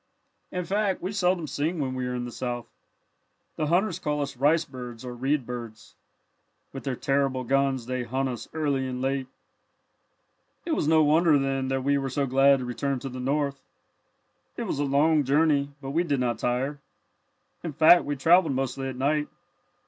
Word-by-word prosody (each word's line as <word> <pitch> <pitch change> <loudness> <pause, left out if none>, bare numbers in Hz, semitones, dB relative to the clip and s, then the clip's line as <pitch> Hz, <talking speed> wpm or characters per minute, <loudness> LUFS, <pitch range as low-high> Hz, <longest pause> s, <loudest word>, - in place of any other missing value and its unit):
"In 180 -1 -3
fact 200 0 0
we 185 - -4
seldom 180 -4 +1
sing 150 +5 -2
when 130 -3 -1
we 130 -1 -3
are 125 - -3
in 120 0 -3
the 120 - -6
South. 120 -1 -4 0.9
The 155 - -1
hunters 180 +2 +1
call 150 -4 -1
us 140 -1 -6
'rice 150 +6 +3
birds' 125 -3 -9
or 125 - -5
'reed 135 +2 0
birds.' 115 -3 -8 0.8
With 135 - -7
their 135 -2 -1
terrible 135 -1 0
guns 135 -1 +1
they 130 +1 -2
hunt 130 +3 -1
us 125 -2 -5
early 140 -4 -1
and 125 -1 -4
late. 135 0 -1 1.4
"It 340 - -3
was 305 - 0
no 160 0 +5
wonder, 155 +1 +4
then, 135 -1 -1
that 135 0 -1
we 140 +1 +2
were 135 -1 -3
so 140 +2 0
glad 135 +1 +5
to 130 - -5
return 135 +3 -2
to 135 +2 -6
the 130 0 -7
North. 140 +1 -1 1.0
It - - -2
was - - -3
a 145 - +1
long 145 +2 +3
journey, 145 +1 +2
but 135 - -4
we 165 +4 +1
did 145 -6 0
not 120 -3 -1
tire. 130 +4 -1 0.8
In 165 - -3
fact 160 +4 +6
we 145 - -2
travelled 160 +1 +4
mostly 135 0 -2
at 130 - -5
night. 150 +3 0
140 Hz, 185 wpm, -26 LUFS, 130-150 Hz, 1.4 s, fact